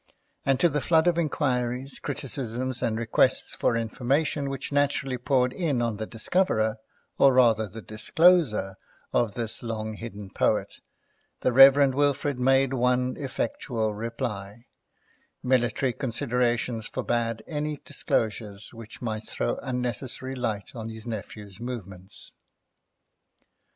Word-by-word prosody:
And 135 -1 +3
to 175 - +5
the 150 -2 -1
flood 160 +1 +3
of 175 -1 +3
inquiries, 130 -4 -1
criticisms, 130 -2 -4
and 110 -1 0
requests 115 0 +2
for 115 - +1
information, 140 +5 0
which 135 +1 -5
naturally 140 -2 +1
poured 125 -1 +2
in 155 -8 0
on 115 -3 -1
the 110 0 -4
discoverer, 110 - +1 0.4
or 135 -1 +6
rather 115 -4 +4
the 110 +2 -10
discloser, 110 - +3 0.4
of 110 -4 +1
this 115 -2 -4
long 110 -2 -4
hidden 105 -3 -8
poet, - - 0 0.6
the 125 - +1
Rev. 135 +1 +8
Wilfrid 145 -1 +1
made 135 +1 +3
one 125 0 +1
effectual 130 - -2
reply: 105 -1 -5 0.8
Military 125 0 +1
considerations 120 -2 -1
forbade 115 -2 -2
any 150 -1 -3
disclosures 105 -2 -2
which 115 +1 -11
might 110 -2 -3
throw - - -2
unnecessary 130 0 -2
light 110 -6 -3
on 115 -2 -6
his 110 0 -9
nephew's 105 -3 -7
movements. 100 -6 -8
120 Hz, 120 wpm, -26 LUFS, 110-135 Hz, 0.8 s, Rev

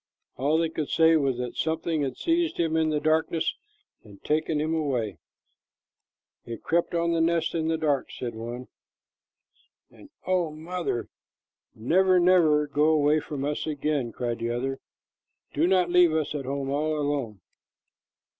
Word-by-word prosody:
All 145 +5 +1
they 165 0 +1
could 155 -2 -4
say 160 0 +4
was 135 -5 +1
that 125 -1 -4
something 160 0 -1
had 135 -2 -3
seized 335 0 0
him 165 -2 0
in 160 -1 +2
the 150 -1 0
darkness 160 +1 +1 0.5
and 100 -2 -15
taken 155 0 0
him 155 +2 -1
away. 125 - -2 1.2
"It 115 -1 -8
crept 170 +1 0
up 170 0 +1
to 170 - +1
the 165 - +1
nest 165 0 +1
in 160 -1 -1
the 160 0 +1
dark," 150 -4 0
said 120 -2 -6
one. 120 +3 -7 1.2
"And - - -16 0.2
oh, 180 -3 +1
mother, 160 -4 -4 0.7
never, 185 +10 +3
never 170 -4 +4
go 145 +1 +1
away 155 -1 +3
from 145 -2 -5
us 150 +2 -2
again!" 145 -4 -1
cried 120 0 -4
another. 120 +3 -2 0.7
"Do 160 +4 +2
not 180 -2 +2
leave 175 -2 +5
us 155 -2 -1
at 140 -3 -4
home 135 0 -3
all 155 +2 0
alone." 140 -8 -2
155 Hz, 155 wpm, -26 LUFS, 135-165 Hz, 1.2 s, leave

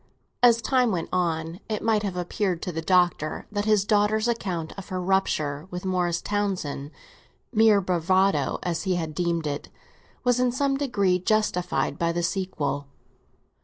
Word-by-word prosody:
As 235 -1 +5
time 255 -3 +2
went 170 -4 -2
on, 165 -1 -1
it 215 -1 -2
might 220 -2 +2
have 195 -3 -3
appeared 180 0 -1
to 180 - -3
the 165 -1 -3
Doctor 175 -3 +1
that 205 0 -1
his 210 -2 +3
daughter's 215 +2 +2
account 185 -9 -2
of 195 0 -9
her 185 -1 -2
rupture 175 -5 0
with 180 0 -6
Morris 180 -2 0
Townsend, 190 -9 -2 0.6
mere 220 -2 +5
bravado 185 +2 +2
as 170 -2 -1
he 185 +1 0
had 160 -3 -3
deemed 170 -1 -1
it, 145 -1 -4 0.5
was 245 -1 +2
in 250 -1 +2
some 275 +2 +1
degree 200 -10 +1
justified 180 -8 0
by 170 0 +1
the 175 0 -2
sequel. 150 -7 -2
185 Hz, 160 wpm, -25 LUFS, 170-210 Hz, 0.6 s, As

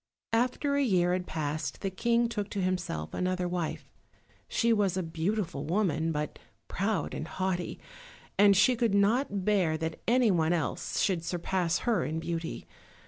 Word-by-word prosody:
After 255 +5 +1
a 285 - +2
year 180 -7 +3
had 180 0 -2
passed 150 -2 -3
the 195 - -2
King 235 +4 +2
took 210 -3 -3
to 205 - -3
himself 180 - -2
another 180 0 -1
wife. 175 -2 -3 0.6
She 230 0 +2
was 200 -4 +1
a 185 - 0
beautiful 165 -1 -2
woman, 165 -2 0
but 150 -1 -3 0.3
proud 200 +2 -1
and 155 - -4
haughty, 185 -1 -2 0.6
and 200 -1 +6
she 215 +6 +5
could 230 -4 +1
not 200 -1 +2
bear 185 -7 +2
that 160 0 -4
anyone 205 -10 +3
else 165 -4 -2
should 180 -4 +1
surpass 175 0 0
her 235 -3 +1
in 160 +1 -2
beauty. 165 0 -4
185 Hz, 155 wpm, -29 LUFS, 165-210 Hz, 0.6 s, and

